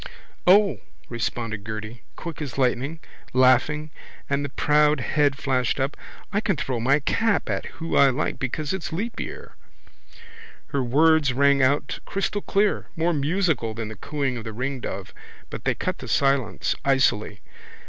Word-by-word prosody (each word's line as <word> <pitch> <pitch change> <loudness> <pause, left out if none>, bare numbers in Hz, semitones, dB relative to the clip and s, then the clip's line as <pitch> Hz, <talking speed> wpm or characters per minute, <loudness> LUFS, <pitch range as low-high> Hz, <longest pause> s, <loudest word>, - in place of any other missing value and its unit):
—O, 200 +1 +5 0.3
responded 115 -2 -3
Gerty, 110 +2 -6
quick 165 -3 -7
as 145 -3 -5
lightning, 135 +4 0 0.3
laughing, 130 +4 +3 0.4
and 140 +1 0
the 140 - -3
proud 150 +1 +3
head 145 +2 +1
flashed 130 -2 0
up. 135 +2 -1 0.4
I 205 - +2
can 200 -4 +1
throw 130 -3 -2
my 135 +5 +3
cap 225 +8 +1
at - - -2
who 165 0 -3
I 140 - +7
like 135 +4 -2
because 145 +5 -2
it's 190 -3 -4
leap 210 +9 -3
year. - - -7 1.2
Her 140 - 0
words 145 +2 +4
rang 140 +1 +4
out 140 +3 +1
crystalclear, 200 +1 0
more 170 +1 +1
musical 150 - 0
than 115 -1 -4
the 110 - -7
cooing 140 +1 -2
of 115 - -6
the 110 -1 -6
ringdove, 130 +2 -4 0.4
but - - -7
they - - +2
cut - - -3
the - - -8
silence 135 -7 +1
icily. 130 -7 +1
140 Hz, 150 wpm, -24 LUFS, 125-155 Hz, 1.2 s, I